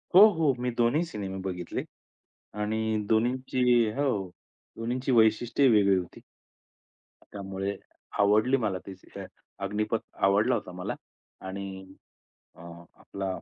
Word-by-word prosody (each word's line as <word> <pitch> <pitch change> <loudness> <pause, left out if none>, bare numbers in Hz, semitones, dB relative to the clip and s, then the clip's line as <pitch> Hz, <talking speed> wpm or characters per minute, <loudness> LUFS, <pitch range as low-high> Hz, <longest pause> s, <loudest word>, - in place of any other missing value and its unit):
हो, 190 - +10
हो. 160 -5 +2
मी 125 0 -1
दोन्ही 120 +7 +3
सिनेमे 100 - -5
बघितले 90 -2 -4 0.8
आणि 110 +1 0
दोन्हींची 125 +3 +1 0.3
हो, 115 -10 0 0.5
दोन्हींची 125 +4 -2
वैशिष्ट्येही 115 +3 +4
वेगळी 100 -2 +5
होती. 90 -2 -6 1.1
त्यामुळे, 100 0 -4 0.4
आवडली 110 +6 +4
मला 105 -7 -1
ती 100 - -6 0.7
अग्निपथ 105 +3 -1 0.2
आवडला 105 +6 +4
होता - - -5
मला 90 0 -4 0.5
आणि 95 0 -6 0.7
अ, - - -16 0.3
आपला 100 0 -7
110 Hz, 105 wpm, -28 LUFS, 95-125 Hz, 1.1 s, हो